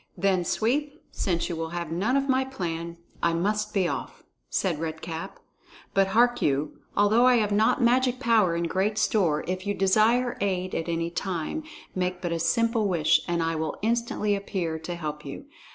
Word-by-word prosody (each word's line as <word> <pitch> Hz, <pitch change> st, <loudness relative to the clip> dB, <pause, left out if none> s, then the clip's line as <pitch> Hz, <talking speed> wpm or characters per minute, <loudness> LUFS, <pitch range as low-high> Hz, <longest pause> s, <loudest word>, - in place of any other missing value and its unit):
"Then, 190 Hz, 0 st, +2 dB
Sweep, 285 Hz, -, -1 dB
since 170 Hz, -3 st, -1 dB
you 175 Hz, -, -3 dB
will 160 Hz, 0 st, -3 dB
have 170 Hz, -2 st, -4 dB
none 210 Hz, +11 st, +1 dB
of 275 Hz, 0 st, 0 dB
my 260 Hz, -1 st, +3 dB
plan, 170 Hz, -9 st, -5 dB, 0.2 s
I 170 Hz, -, +2 dB
must 210 Hz, +5 st, 0 dB
be 190 Hz, -3 st, +1 dB
off," -, -, -5 dB, 0.3 s
said 175 Hz, -6 st, 0 dB
Red 160 Hz, -1 st, -4 dB
Cap. 165 Hz, 0 st, -6 dB, 0.6 s
"But 195 Hz, -1 st, +3 dB
hark 240 Hz, +4 st, +3 dB
you; 145 Hz, +1 st, 0 dB, 0.2 s
although 220 Hz, +5 st, +5 dB
I 250 Hz, -, +6 dB
have 210 Hz, -3 st, +1 dB
not 220 Hz, +5 st, +3 dB
magic 250 Hz, +1 st, +3 dB
power 220 Hz, -9 st, +3 dB
in 170 Hz, -, -1 dB
great 190 Hz, +5 st, 0 dB
store, 180 Hz, -8 st, +2 dB
if 185 Hz, +2 st, -3 dB
you 205 Hz, -, 0 dB
desire 220 Hz, +6 st, +3 dB
aid 185 Hz, -2 st, -1 dB
at 165 Hz, -, -2 dB
any 165 Hz, 0 st, -1 dB
time, 180 Hz, -, -3 dB, 0.3 s
make 180 Hz, -1 st, -1 dB
but 175 Hz, -2 st, -3 dB
a 170 Hz, -, -1 dB
simple 225 Hz, +6 st, +2 dB
wish, 170 Hz, -5 st, +3 dB
and 170 Hz, -1 st, 0 dB
I 165 Hz, 0 st, 0 dB
will 155 Hz, -1 st, -3 dB
instantly 230 Hz, -2 st, 0 dB
appear 180 Hz, -5 st, -3 dB
to 175 Hz, +2 st, -5 dB
help 150 Hz, -3 st, -5 dB
you. 140 Hz, -, -8 dB
190 Hz, 185 wpm, -26 LUFS, 170-225 Hz, 0.6 s, I